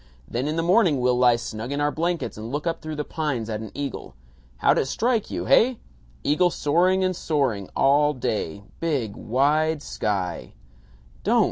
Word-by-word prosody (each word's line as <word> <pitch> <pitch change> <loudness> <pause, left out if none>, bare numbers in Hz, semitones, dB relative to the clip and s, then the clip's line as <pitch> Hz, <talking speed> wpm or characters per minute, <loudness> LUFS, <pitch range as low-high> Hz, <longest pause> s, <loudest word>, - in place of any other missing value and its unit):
Then 125 +4 -2
in 155 - -1
the 165 - 0
morning 175 - +4
we'll 125 0 +2
lie 125 -1 +5
snug 115 +1 -5
in 140 - -2
our 145 0 +1
blankets 170 +2 -2
and 110 +2 -7
look 145 +3 -3
up 165 -1 -2
through 155 0 -5
the 150 - -2
pines 140 -9 -3
at 105 - -2
an 110 -1 -7
eagle. 140 -2 -5 0.4
How'd - - +3
it - - 0
strike 230 - 0
you? - - -3
Heh? 250 +3 +4 0.5
Eagle 175 +5 +3
soaring 180 +5 +2
and 185 0 +1
soaring 130 - -1
all 145 +2 +3
day 100 -6 -3 0.2
big 140 -11 -1
wide 150 +5 +1
sky 90 -9 -3 0.3
" - - -27
"Don't! - - +3
145 Hz, 180 wpm, -24 LUFS, 115-165 Hz, 0.5 s, lie